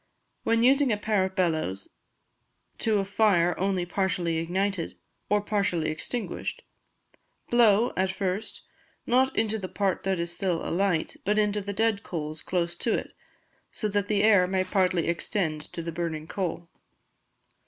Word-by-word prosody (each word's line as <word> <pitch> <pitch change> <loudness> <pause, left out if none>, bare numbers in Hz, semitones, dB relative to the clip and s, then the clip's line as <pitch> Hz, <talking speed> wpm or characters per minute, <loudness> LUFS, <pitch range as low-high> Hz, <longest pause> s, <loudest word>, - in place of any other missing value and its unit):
When 230 0 +2
using 270 +1 +5
a 210 - +1
pair 210 -2 +1
of 190 0 -6
bellows 155 - 0 0.9
to 220 -2 +2
a 195 - 0
fire 195 -4 +3
only 190 -1 0
partially 175 -3 0
ignited, 180 +2 -1 0.3
or 210 0 +3
partially 200 -6 0
extinguished, 245 - -4 0.9
blow, 235 -1 +5
at 190 0 +1
first, 190 +2 -3 0.4
not 260 +2 +2
into 220 0 +1
the 185 -2 -5
part 195 -3 0
that 190 -2 -1
is 170 0 -2
still 180 -3 -1
alight, 180 -2 0
but 210 +2 +1
into 210 -1 +2
the 200 +1 -4
dead 220 0 +1
coals 155 -2 -5
close 175 -2 -1
to 230 - +1
it, - - -6 0.6
so 215 - -1
that 205 0 0
the 205 -1 +2
air 200 -4 +5
may 185 0 +1
partly 185 -3 +1
extend 170 -3 -2
to 170 - -5
the 170 - -4
burning 165 -2 -3
coal. 175 -1 -3
190 Hz, 155 wpm, -27 LUFS, 170-210 Hz, 0.9 s, using